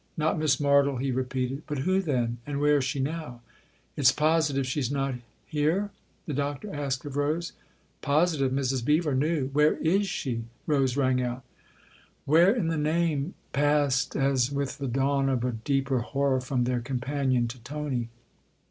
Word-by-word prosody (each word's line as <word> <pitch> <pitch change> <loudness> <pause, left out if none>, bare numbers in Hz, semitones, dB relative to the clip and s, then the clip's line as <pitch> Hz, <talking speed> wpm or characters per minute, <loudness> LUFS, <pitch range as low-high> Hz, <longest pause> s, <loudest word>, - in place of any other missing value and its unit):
" - - -39
Not 155 +1 +1
Miss 155 -3 +3
Martle," 140 -2 +3
he 135 +1 -1
repeated. 130 +1 -2
" - - -34
But 150 -1 -3
who 185 +8 +1
then? 120 -8 -1
And 140 -1 -2
where 145 0 +4
is 140 - 0
she 135 +1 -2
now? 140 -3 -4 0.2
" - - -34
" - - -39
It's 130 -3 +5
positive 150 -2 +1
she's 130 -1 -1
not 135 -1 -1 0.3
here? 165 +7 0 0.2
" - - -39
the 150 - -4
Doctor 145 +7 -3
asked 140 -1 -3
of 145 -1 -5
Rose. 155 +4 -1 0.3
" - - -39
Positive 150 -3 +2
Mrs. 130 -2 0
Beever 150 +2 +2
knew. 145 0 0
Where 150 +1 +4
is 195 +5 +1
she? 120 -10 -3
" - - -37
Rose 135 -4 +1
rang 130 -2 +2
out. 125 0 -3 0.4
" - - -30
Where 165 +6 +5
in 220 -7 0
the 165 - -1
name? 155 0 0
" - - -37
passed, 145 -1 +2
as 135 -2 +2
with 140 -1 -3
the 140 - -2
dawn 135 +2 +1
of 125 -3 0
a 125 - 0
deeper 135 +3 0
horror, 135 +1 0
from 130 -1 -1
their 125 0 0
companion 130 0 0
to 125 +2 -8
Tony. 130 -2 -4
140 Hz, 190 wpm, -27 LUFS, 130-150 Hz, 0.4 s, It's